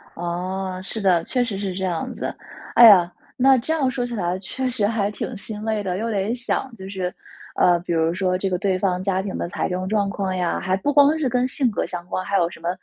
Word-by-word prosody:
哦， 185 +2 -3
是 215 +3 -5
的。 180 -4 +3
确 250 +7 0
实 225 -5 -3
是 195 -1 -3
这 190 +1 -4
样 175 -3 -2
子。 - - -4 0.4
哎 240 - +10
呀， 180 -5 +7 0.3
那 265 0 +5
这 265 +7 -1
样 285 -5 +1
说 250 -1 -2
起 240 - -6
来 180 -3 -1
确 255 +7 -3
实 235 -4 0
还 210 -2 0
挺 220 +3 -5
心 210 +1 -7
累 220 -1 -1
的， 185 -2 -2
又 225 +3 -2
得 205 +2 0
想 250 +1 -2
就 190 -1 -8
是 185 -2 -3 0.4
呃， 175 -1 +4
比 175 0 -3
如 165 0 +2
说 185 0 0
这 195 +1 -1
个 180 - 0
对 190 0 0
方 185 -1 0
家 190 -1 0
庭 190 0 -4
的 - - -2
财 - - -2
政 185 +1 -2
状 205 -2 +1
况 195 -2 -2
呀， 180 -2 0
还 185 0 0
不 290 +9 -1
光 290 +2 +5
是 295 - +1
跟 250 +1 +1
性 260 -1 0
格 - - -1
相 175 -1 -6
关， 185 - -2
还 200 - +1
有 170 -2 +2
什 175 - -12
么 170 +1 -3
195 Hz, 270 characters per minute, -22 LUFS, 180-230 Hz, 0.4 s, 哎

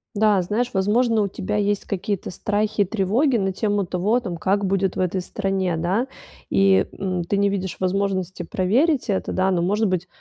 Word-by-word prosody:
Да, 210 -2 +3
знаешь, 220 +7 -1
возможно, 220 +4 +2
у 205 - +1
тебя 195 +1 -3
есть 205 -1 0
какие-то 200 -1 -3
страхи 210 +2 -1
и - - +4
тревоги 225 - +1
на 195 -2 0
тему 205 0 0
того, 190 +7 +1
там, 185 -8 -5
как 195 +4 0
будет 195 -1 0
в - - -4
этой 185 0 0
стране, 190 -2 -1
да, 190 +10 0 0.4
и, 195 0 +4
м, 185 -2 -2
ты 200 +4 -1
не 200 0 +3
видишь 190 -2 -3
возможности 190 -1 -1
проверить 240 - +1
это, 195 - -1
да, 190 +1 +1
но, 175 -2 +1
может 205 +5 +1
быть, 185 -1 -1
195 Hz, 190 wpm, -22 LUFS, 185-210 Hz, 0.4 s, и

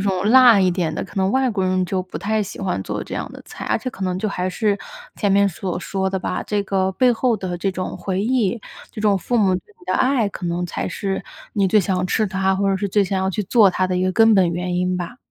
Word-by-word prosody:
一 - - -1
种 195 -1 0
辣 245 -4 +8
一 185 -1 +3
点 170 -3 -1
的， - - -3
可 - - -15
能 190 0 +2
外 260 +2 +2
国 195 -4 -1
人 185 0 +1
就 185 0 -1
不 185 - -8
太 215 +3 0
喜 205 - -8
欢 185 - -2
做 - - -4
这 - - -7
样 - - -4
的 - - -11
菜。 - - -9
而 - - +1
且 255 +3 -5
可 195 - -9
能 185 0 -1
就 215 - -1
还 185 -2 -2
是， 205 +1 0 0.4
前 205 - 0
面 200 0 +4
所 180 0 -4
说 190 +1 -2
的 190 - -1
吧。 185 - -3
这 205 -1 -1
个 190 -1 0
背 245 +6 +3
后 235 -1 +1
的 185 -2 -4
这 195 +1 0
种 185 0 -5
回 190 -1 -2
忆， 235 -2 0 0.3
这 - - -8
种 210 -2 +3
父 240 +7 -1
母 195 -4 +3
对 180 - -3 0.2
你 355 - -18
的 - - -1
爱， 255 -5 +2
可 185 -2 -6
能 175 +1 -1
才 - - -4
是 195 -1 -3 0.3
你 195 -2 +1
最 215 - +4
想 185 -1 -1
吃 215 +3 +1
它， 190 -1 0
或 195 +1 0
者 195 - +1
是 200 +1 -2
最 200 +1 +2
想 190 0 -1
要 190 0 0
去 210 +3 -2
做 205 -1 +5
它 185 +1 0
的 185 0 -1
一 180 - 0
个 185 0 +1
根 225 +1 +5
本 185 -3 +4
原 180 +1 -3
因 180 0 0
吧。 180 +7 -5
195 Hz, 300 characters per minute, -21 LUFS, 185-210 Hz, 0.4 s, 辣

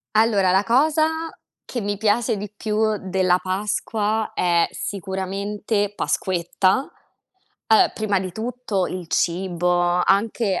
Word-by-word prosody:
Allora, 210 -4 +4
la 190 +2 +3
cosa 300 +6 +3 0.6
che 250 - -5
mi 205 -1 -2
piace 215 +2 +1
di 205 0 -6
più 215 0 0
della 185 -1 +1
Pasqua 210 +3 -1
è 170 -1 +2
sicuramente 200 +2 -3
Pasquetta. 185 +6 0 0.8
Allora, 220 - +5
prima 210 -2 0
di 185 -1 -4
tutto 220 -2 -2
il 180 -2 -6
cibo, 175 0 0 0.3
anche 200 -1 +1
205 Hz, 115 wpm, -22 LUFS, 185-220 Hz, 0.8 s, Allora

